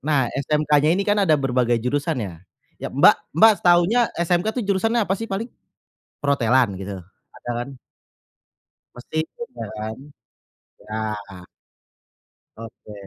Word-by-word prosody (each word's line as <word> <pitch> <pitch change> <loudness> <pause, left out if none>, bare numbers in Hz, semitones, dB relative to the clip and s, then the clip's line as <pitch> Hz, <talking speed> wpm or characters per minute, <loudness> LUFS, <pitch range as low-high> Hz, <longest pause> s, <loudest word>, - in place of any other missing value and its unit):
Nah 140 -4 0
SMK-nya 150 +1 +1
ini 200 - 0
kan 205 0 +2
ada 160 -6 +4
berbagai 125 -3 +1
jurusan 140 +7 -1
ya. 90 -4 -7 0.5
Ya, - - -4
Mbak - - +5 0.2
Mbak 220 +6 +8
taunya 180 +7 +4
SMK 175 +2 +1
tuh 250 - 0
jurusannya 220 +4 +1
apa 190 - -1
sih 225 +3 -6
paling? 195 +4 -3 0.7
Perhotelan 130 -5 +2
gitu? 95 +1 -6 0.4
Ada - - -8
kan? 135 0 -12 1.2
Mesin 155 +6 -3
juga 120 - -7
kan? 110 +1 -5 0.9
Iya. 105 -4 -6 1.1
Oke. 115 -1 -11
140 Hz, 125 wpm, -22 LUFS, 115-185 Hz, 1.2 s, Mbak